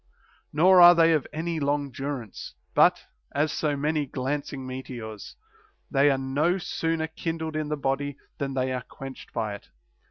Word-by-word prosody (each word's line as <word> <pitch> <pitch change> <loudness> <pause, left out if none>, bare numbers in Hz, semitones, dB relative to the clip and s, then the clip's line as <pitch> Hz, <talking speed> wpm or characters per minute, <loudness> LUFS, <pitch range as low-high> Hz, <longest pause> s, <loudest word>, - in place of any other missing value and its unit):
Nor 180 +4 +6
are 175 0 +10
they 165 -1 +5
of 150 -4 0
any 165 +1 -2
long 145 -1 0
durance, 130 -4 -6 0.2
but, - - +4 0.3
as 150 +2 +2
so 150 -2 -1
many 150 0 0
glancing 135 +1 -3
meteors, 120 -5 -7 0.6
they 140 +2 +4
are 135 - +2
no 145 +7 +1
sooner 165 -2 -1
kindled 160 0 -4
in 155 -1 -2
the 150 - -1
body 140 0 -2 0.2
than 135 -1 -2
they 130 0 0
are 125 - -2
quenched 135 +2 -10
by 110 -2 -2
it. 100 - -11
145 Hz, 160 wpm, -26 LUFS, 130-160 Hz, 0.6 s, are